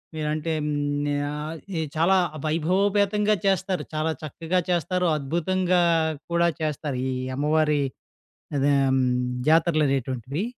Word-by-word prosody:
మీరంటే 155 +1 -2
హ్మ్, 145 0 -1 0.2
ఆహ్, 150 +2 -5 0.2
ఎ - - 0
చాలా 175 +4 +4 0.3
వైభవోపేతంగా 200 +6 +2
చేస్తారు, 190 -1 0
చాలా 155 +1 0
చక్కగా 165 +4 -1
చేస్తారు, 180 +1 +1
అద్భుతంగా 175 +5 +1 0.5
కూడా 170 0 +3
చేస్తారు. 150 -3 -2
ఈ - - -1 0.2
అమ్మవారి 150 +1 +2 0.8
అదే 140 +1 +3
హ్మ్, 130 -1 +2 0.5
జాతరలనేటువంటివి. 145 - +1
155 Hz, 100 wpm, -25 LUFS, 145-180 Hz, 0.8 s, చాలా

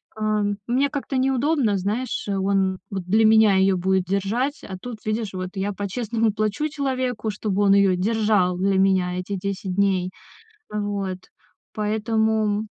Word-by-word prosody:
а, 215 -1 0 0.2
мне 265 +4 +2
как-то 275 -2 -3
неудобно, 265 -3 +1
знаешь, 210 +8 -2
он 195 -1 0
вот 190 -2 -4
для 215 +5 +3
меня 220 -2 +6
её 190 0 +3
будет 190 +1 +1
держать, 210 - -1
а 190 - -6
тут, 245 -3 -6
видишь, 215 -2 -2
вот 185 0 -4
я 195 +1 -2
по-честному 220 +2 -1
плачу 215 +8 -1
человеку, 255 -6 -2
чтобы 205 -1 -2
он 195 -1 +5
её 195 -2 +4
держал 205 -2 +1
для 195 +1 +1
меня 185 -2 +2
эти 200 +2 -4
10 190 -1 -4
дней. 190 -2 +1 0.6
Вот, 200 -3 -2 0.6
поэтому 220 0 0
205 Hz, 145 wpm, -23 LUFS, 190-220 Hz, 0.6 s, меня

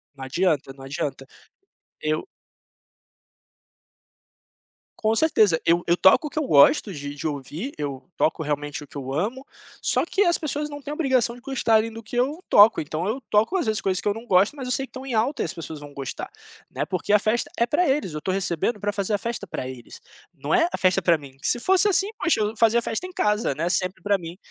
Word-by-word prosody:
Não 135 -1 -7
adianta, 145 -2 0
não 135 0 -13
adianta. 135 -1 -4 0.8
Eu 155 0 -1 2.7
Com 220 0 +1
certeza. 215 - +3
Eu 170 +1 +3
eu 170 - +3
toco 190 - +5
o - - -3
que 310 - -3
eu - - 0
gosto 155 - +5
de 145 -3 -6
de 145 +2 -4
ouvir, 150 - -5
eu 140 -3 -4
toco 160 - +1
realmente 145 0 -3
o 145 - -13
que - - -19
eu 135 0 -5
amo, 235 - -2 0.3
só - - +1
que 390 +4 +1
as 345 -2 +2
pessoas 300 -1 -2
não 290 0 -7
têm 290 - -7
a - - -3
obrigação 260 -6 +1
de 245 - -14
gostarem 230 -4 +1
do 225 - -8
que 220 +2 -9
eu 285 +8 0
toco, 205 -1 +7
então 155 +3 -4
eu 255 +5 -2
toco, 220 - +2
às 340 - -1
vezes, 215 0 +1
coisas 185 -1 -1
que - - -4
eu 205 - +2
não 230 +2 -8
gosto, 195 +5 +3
mas 265 -3 -6
eu - - -2
sei 270 +1 -1
que - - -40
estão 260 +2 -9
em 260 - -4
alta 240 +6 +1
e - - -1
as 165 - -4
pessoas 160 -2 -7
vão 145 -1 -11
gostar, 135 -2 -6 0.4
né, - - -2
porque 185 +3 -1
a 210 - +6
festa 220 +3 0
é 235 - +1
pra 330 +7 +2
eles, 265 - 0
eu - - -4
estou 185 - -2
recebendo 195 +3 -1
pra 205 +1 -1
fazer 205 +1 -2
a - - +3
festa 235 +1 -4
pra 130 - -5
eles, 130 -2 -10 0.3
não - - -6
é 330 - +4
a - - -1
festa 185 0 +3
pra 170 -2 +3
mim, 140 -3 -10
se 240 - +1
fosse 380 - +3
assim, 390 0 +2
poxa, 330 - +1
eu 210 +1 -1
fazia 230 +1 +4
festa 230 +9 -3
em 370 - -7
casa, 210 -7 +1
né, 165 +5 -2
sempre 185 +1 -1
pra 205 -1 +2
mim. 170 0 -9
205 Hz, 235 wpm, -24 LUFS, 155-250 Hz, 2.7 s, toco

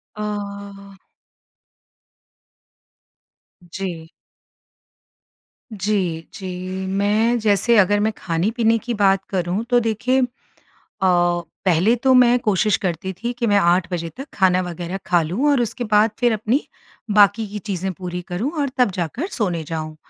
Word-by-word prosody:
अ 200 -1 -6 2.7
जी। 170 -3 -5 1.7
जी, 190 -5 -2
जी, 185 -1 -5
मैं 210 +5 +1
जैसे 215 +2 +3
अगर 205 +1 +4
मैं 215 +1 +1
खाने-पीने 220 +7 +1
की 240 +2 -4
बात 195 -2 +2
करूँ 185 +2 -1
तो 245 -1 +4
देखिए 240 +3 0
अ, 250 - +1 1.4
पहले 185 +6 +3
तो 260 +2 +2
मैं 245 -1 +6
कोशिश 210 -2 +2
करती 180 +1 -2
थी 235 +7 -4
कि 235 - +1
मैं 205 -1 +4
8 175 -2 +3
बजे 170 -2 -3
तक 270 +2 -7
खाना 185 -2 +3
वग़ैरह 175 +1 -5
खा 175 -1 +3
लूँ 205 - 0
और 275 -4 +2
उसके 240 +1 -3
बाद 215 0 +3
फ़िर 240 -2 +3
अपनी 220 +6 0 0.5
बाकी 210 +1 +4
की 210 +1 -6
चीज़ें 190 -2 -3
पूरी 180 0 -6
करूँ 195 +11 -2
और 280 - 0
तब 250 -5 +3
जाकर 185 - -3
सोने 180 -8 -2
जाऊँ। 155 0 -5
200 Hz, 135 wpm, -21 LUFS, 180-225 Hz, 2.7 s, मैं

